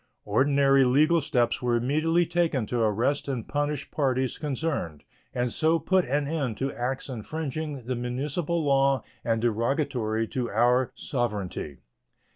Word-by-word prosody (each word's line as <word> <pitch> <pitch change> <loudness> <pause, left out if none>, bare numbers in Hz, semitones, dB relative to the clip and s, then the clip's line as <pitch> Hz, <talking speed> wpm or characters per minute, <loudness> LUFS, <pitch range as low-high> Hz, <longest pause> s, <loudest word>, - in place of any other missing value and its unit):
Ordinary 135 +5 +4
legal 155 +6 +4
steps 120 -5 0
were 120 -1 +1
immediately 155 +8 +2
taken 165 -9 0
to 120 +3 -2
arrest 115 +7 +1
and 130 -5 -3
punish 145 0 -2
parties 130 -3 0
concerned, 140 - -3 0.3
and 125 -1 -1
so 160 +5 +2
put 185 +2 +2
an 145 +2 0
end 140 -8 -2
to 135 +1 -2
acts 130 +2 -3
infringing 145 +2 -5
the 130 - -2
municipal 145 +7 -2
law 135 -2 +3 0.2
and 115 -1 0
derogatory 115 -1 0
to 125 -3 -2
our 125 +1 +2
sovereignty. 105 - -3
135 Hz, 135 wpm, -27 LUFS, 120-150 Hz, 0.3 s, Ordinary